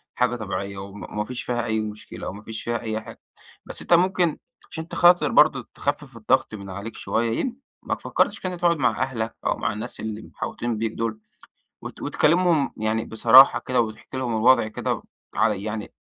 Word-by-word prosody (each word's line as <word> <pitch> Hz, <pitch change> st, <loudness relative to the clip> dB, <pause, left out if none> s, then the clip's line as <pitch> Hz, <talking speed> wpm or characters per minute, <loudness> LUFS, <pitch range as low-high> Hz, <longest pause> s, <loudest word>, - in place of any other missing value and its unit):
حاجة 125 Hz, -1 st, +1 dB
طبيعية، 100 Hz, -3 st, -4 dB
وما 100 Hz, +1 st, -8 dB
ما 105 Hz, -, -1 dB
فيش 125 Hz, +3 st, -6 dB
فيها 120 Hz, -2 st, -1 dB
أي 110 Hz, -1 st, 0 dB
مشكلة 105 Hz, 0 st, -6 dB
وما 100 Hz, +2 st, -8 dB
فيش 110 Hz, +1 st, -7 dB
فيها 120 Hz, 0 st, -1 dB
أي 110 Hz, -1 st, -3 dB
حاجة، -, -, -12 dB, 0.5 s
بس -, -, -3 dB
أنت -, -, +1 dB
ممكن 175 Hz, -2 st, +3 dB, 0.3 s
عشان 160 Hz, -, -5 dB
أنت 165 Hz, -, -9 dB
خاطر 175 Hz, +1 st, +5 dB
برضه -, -, +4 dB
تخفِّف -, -, -3 dB
الضغط -, -, +1 dB
من 100 Hz, -2 st, -7 dB
عليك 100 Hz, +4 st, -7 dB
شوية 115 Hz, 0 st, -1 dB
يم 250 Hz, -2 st, -2 dB, 0.3 s
ما -, -, -1 dB
فكَّرتش -, -, 0 dB
كده 185 Hz, -1 st, -4 dB
تقعد 170 Hz, -1 st, +2 dB
مع 125 Hz, -3 st, +1 dB
أهلك 115 Hz, -4 st, -3 dB
أو -, -, +1 dB
مع 115 Hz, -, -1 dB
الناس 110 Hz, +4 st, -6 dB
اللي 110 Hz, 0 st, -4 dB
محاوطين 120 Hz, +1 st, -4 dB
بيك 110 Hz, 0 st, -1 dB
دول 110 Hz, -1 st, -3 dB, 0.6 s
وت -, -, -9 dB
وتكلمهم 165 Hz, -3 st, +2 dB
يعني 110 Hz, +1 st, -1 dB
بصراحة 115 Hz, +4 st, +7 dB
كده 125 Hz, -2 st, +2 dB
وتحكي 110 Hz, +2 st, -5 dB
لهم 120 Hz, -3 st, -1 dB
الوضع 120 Hz, +1 st, +5 dB
كده 110 Hz, -, -3 dB, 0.3 s
على 95 Hz, -, +1 dB
يعني 105 Hz, 0 st, -5 dB
115 Hz, 185 wpm, -24 LUFS, 110-130 Hz, 0.6 s, بصراحة